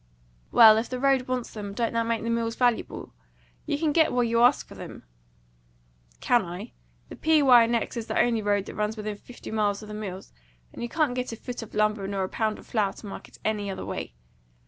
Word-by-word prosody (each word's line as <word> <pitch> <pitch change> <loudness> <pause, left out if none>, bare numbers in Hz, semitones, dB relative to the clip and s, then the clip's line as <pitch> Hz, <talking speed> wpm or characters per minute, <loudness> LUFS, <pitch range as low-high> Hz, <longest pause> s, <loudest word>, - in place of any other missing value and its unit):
"Well, 220 -2 +8
if 225 - -2
the 255 - -4
road 270 -1 +2
wants 255 -2 -2
them, 205 -2 -6
don't 230 0 -1
that 230 0 0
make 230 -1 -1
the 230 - -1
mills 230 0 -1
valuable? 245 -2 -1 0.5
You - - 0
can 310 0 +1
get 320 +1 +3
what 245 -1 +1
you 230 0 +2
ask 245 - +4
for - - -12
them!" - - -10 1.2
"Can 240 -3 +3
I? 175 0 -7 0.4
The - - -8
P. 315 -2 +3
Y. 245 -3 +7
& - - -2
X. 235 +1 -1
is 230 -1 -4
the - - -1
only 230 -2 +2
road 205 -1 +1
that - - -8
runs 210 +1 -2
within 210 -1 -4
fifty 245 +3 -11
miles 210 -1 0
of - - -10
the - - -6
mills, 195 -3 -7 0.4
and - - -9
you 240 - -3
can't 305 -2 +1
get 250 -1 -3
a - - -4
foot 245 +2 -7
of 225 - -10
lumber 210 -2 +1
nor 195 -1 -2
a 185 - -3
pound 215 -1 -1
of - - -14
flour 210 -4 0
to - - -13
market 200 - -9
any 210 -2 -1
other 190 - -5
way. - - -5
230 Hz, 235 wpm, -26 LUFS, 210-245 Hz, 1.2 s, Well